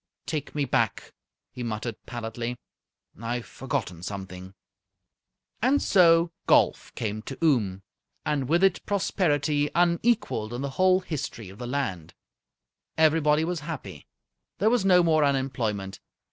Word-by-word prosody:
"Take 150 Hz, -2 st, -4 dB
me 145 Hz, -1 st, +1 dB
back," 115 Hz, -4 st, -1 dB, 0.4 s
he 125 Hz, -, -8 dB
muttered, 115 Hz, 0 st, -3 dB
pallidly. 120 Hz, +1 st, -4 dB, 0.6 s
"I've 120 Hz, 0 st, -3 dB
forgotten 95 Hz, -5 st, -4 dB
something!" 95 Hz, 0 st, -7 dB, 1.1 s
And 265 Hz, +5 st, +3 dB
so 170 Hz, -2 st, +4 dB, 0.2 s
golf -, -, +3 dB
came 110 Hz, -1 st, -3 dB
to 135 Hz, +4 st, -8 dB
Oom, 105 Hz, -, +2 dB, 0.4 s
and 140 Hz, -3 st, -1 dB
with 170 Hz, +4 st, +3 dB
it 195 Hz, -, +3 dB
prosperity 150 Hz, -7 st, +1 dB
unequalled 170 Hz, -, +1 dB
in 125 Hz, -, -4 dB
the 140 Hz, -, -3 dB
whole 185 Hz, +4 st, +3 dB
history 135 Hz, -, -5 dB
of 95 Hz, -, -13 dB
the 120 Hz, -, -5 dB
land. 120 Hz, -, -3 dB, 0.8 s
Everybody 155 Hz, -1 st, +4 dB
was 175 Hz, 0 st, -2 dB
happy. 140 Hz, -, -7 dB, 0.5 s
There 215 Hz, +5 st, +3 dB
was 245 Hz, -5 st, +2 dB
no 180 Hz, -2 st, +5 dB
more 155 Hz, -2 st, +3 dB
unemployment. 120 Hz, -8 st, -1 dB
140 Hz, 130 wpm, -26 LUFS, 110-165 Hz, 1.1 s, no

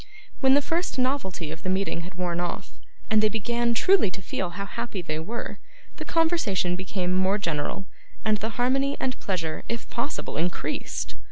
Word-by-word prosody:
When 265 Hz, 0 st, +6 dB
the 285 Hz, -, +4 dB
first 335 Hz, -1 st, 0 dB
novelty 250 Hz, -, 0 dB
of 160 Hz, -, -6 dB
the 185 Hz, -, -2 dB
meeting 190 Hz, -2 st, +1 dB
had 180 Hz, +2 st, -8 dB
worn 175 Hz, -1 st, -1 dB
off, 175 Hz, +2 st, -3 dB, 0.4 s
and 215 Hz, -1 st, +6 dB
they 215 Hz, -, +5 dB
began 235 Hz, +2 st, +1 dB
truly 375 Hz, -, +5 dB
to 185 Hz, +2 st, -6 dB
feel 180 Hz, 0 st, -2 dB
how 200 Hz, -, -2 dB
happy 200 Hz, -2 st, -4 dB
they 155 Hz, -2 st, -2 dB
were, 220 Hz, +9 st, -4 dB, 0.4 s
the -, -, -5 dB
conversation 320 Hz, -, +2 dB
became 185 Hz, -1 st, -1 dB
more 190 Hz, +2 st, +3 dB
general, 170 Hz, 0 st, -1 dB, 0.4 s
and 215 Hz, -1 st, +4 dB
the 220 Hz, +2 st, -3 dB
harmony 270 Hz, +3 st, +2 dB
and 255 Hz, -1 st, -1 dB
pleasure 165 Hz, -5 st, -2 dB
if 235 Hz, 0 st, -2 dB
possible 240 Hz, -, -2 dB
increased. 170 Hz, +2 st, -1 dB
200 Hz, 175 wpm, -27 LUFS, 180-245 Hz, 0.4 s, When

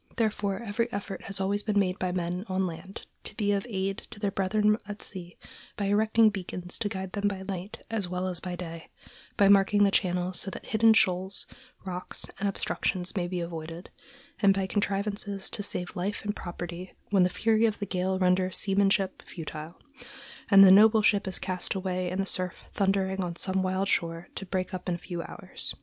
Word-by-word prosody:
Therefore, 210 Hz, -2 st, 0 dB
every 230 Hz, +2 st, -1 dB
effort 195 Hz, -1 st, -5 dB
has 195 Hz, 0 st, -3 dB
always 200 Hz, +2 st, +1 dB
been 210 Hz, -1 st, 0 dB
made 190 Hz, -1 st, +2 dB
by 185 Hz, -1 st, 0 dB
men 180 Hz, +1 st, -2 dB
on 190 Hz, 0 st, +1 dB
land 180 Hz, +3 st, -7 dB, 0.2 s
to -, -, -7 dB
be 205 Hz, -2 st, +1 dB
of 200 Hz, +2 st, 0 dB
aid 195 Hz, -1 st, -1 dB
to -, -, -11 dB
their 205 Hz, -1 st, 0 dB
brethren 210 Hz, +2 st, +2 dB
at 205 Hz, 0 st, -6 dB
sea 180 Hz, -3 st, -8 dB, 0.4 s
by 205 Hz, -, -1 dB
erecting 220 Hz, +2 st, +4 dB
beacons 180 Hz, -2 st, -5 dB
to 215 Hz, -3 st, 0 dB
guide 190 Hz, -2 st, -5 dB
them 205 Hz, +1 st, 0 dB
by 195 Hz, -2 st, -3 dB
night 190 Hz, +1 st, -6 dB
as 210 Hz, -5 st, -1 dB
well 180 Hz, +1 st, -2 dB
as 180 Hz, -2 st, 0 dB
by 180 Hz, -1 st, -4 dB
day, 165 Hz, -2 st, -7 dB, 0.5 s
by 200 Hz, -, +6 dB
marking 200 Hz, +1 st, +5 dB
the 200 Hz, -, +4 dB
channels, 180 Hz, -1 st, +1 dB
so -, -, -2 dB
that -, -, -8 dB
hidden 225 Hz, 0 st, +5 dB
shoals, 190 Hz, -1 st, +1 dB, 0.4 s
rocks, 180 Hz, -1 st, -4 dB
and 200 Hz, 0 st, +1 dB
obstructions 185 Hz, -1 st, -2 dB
may 180 Hz, -3 st, 0 dB
be 180 Hz, 0 st, -2 dB
avoided, 165 Hz, +1 st, -6 dB, 0.5 s
and 195 Hz, -2 st, +6 dB
by 195 Hz, -1 st, 0 dB
contrivances 200 Hz, 0 st, -2 dB
to 210 Hz, -, -2 dB
save 180 Hz, -3 st, -3 dB
life 200 Hz, +4 st, -3 dB
and 205 Hz, 0 st, -1 dB
property 175 Hz, +1 st, -6 dB, 0.2 s
when 195 Hz, -2 st, +5 dB
the 180 Hz, -, +5 dB
fury 225 Hz, +3 st, +3 dB
of 215 Hz, -, -2 dB
the 205 Hz, -, -3 dB
gale 185 Hz, 0 st, 0 dB
renders 185 Hz, 0 st, +2 dB
seamanship 195 Hz, -1 st, +2 dB
futile, 160 Hz, -1 st, -8 dB, 0.7 s
and 195 Hz, -1 st, +9 dB
the 190 Hz, -, +9 dB
noble 215 Hz, +2 st, +7 dB
ship 205 Hz, -2 st, +3 dB
is 190 Hz, -, +1 dB
cast 185 Hz, 0 st, -3 dB
away 185 Hz, -1 st, -1 dB
in 185 Hz, +2 st, -3 dB
the 195 Hz, -, +1 dB
surf 185 Hz, -2 st, -3 dB
thundering 195 Hz, -1 st, +1 dB
on 175 Hz, -2 st, -3 dB
some 190 Hz, +1 st, 0 dB
wild 190 Hz, +1 st, 0 dB
shore, 165 Hz, -1 st, -1 dB
to 195 Hz, -, -6 dB
break 185 Hz, +1 st, -2 dB
up 180 Hz, 0 st, -4 dB
in 175 Hz, -, +1 dB
a -, -, -4 dB
few 175 Hz, 0 st, -5 dB
hours. -, -, -6 dB
190 Hz, 200 wpm, -28 LUFS, 180-205 Hz, 0.7 s, and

